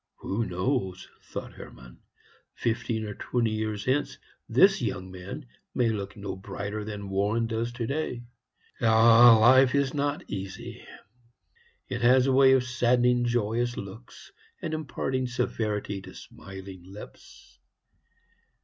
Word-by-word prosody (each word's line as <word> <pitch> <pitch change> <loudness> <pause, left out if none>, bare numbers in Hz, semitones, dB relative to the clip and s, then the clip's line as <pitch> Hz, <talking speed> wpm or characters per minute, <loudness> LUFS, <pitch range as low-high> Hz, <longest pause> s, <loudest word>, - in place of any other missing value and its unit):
"Who 110 +4 -3
knows?" 95 0 -2
thought - - -8
Hermann; 60 -1 -13 0.6
"fifteen 115 -1 -2
or 105 - -5
twenty 115 +2 -1
years 110 -1 -3
hence 145 +3 0 0.3
this 190 - +5
young 95 -5 -3
man 95 +11 -8 0.3
may 120 -2 +2
look 100 -1 -4
no 100 -1 -5
brighter 100 +2 -5
than 105 -1 -6
Warren 105 +4 +1
does 115 +1 -2
today. 125 +1 -3 0.6
Ah, 115 +1 +7
life 130 +3 +6
is 140 -2 +1
not 145 0 -1
easy! 95 -1 -7 1.0
It 120 -2 -4
has 125 +2 +5
a 135 - +2
way 135 0 +6
of 130 -1 +3
saddening 125 -1 +2
joyous 120 +1 0
looks, 100 +5 -10 0.3
and 160 - -4
imparting 130 -4 -2
severity 105 -4 -2
to - - -12
smiling 95 -1 -11
lips. 95 +3 -14
115 Hz, 125 wpm, -27 LUFS, 100-125 Hz, 1.0 s, Ah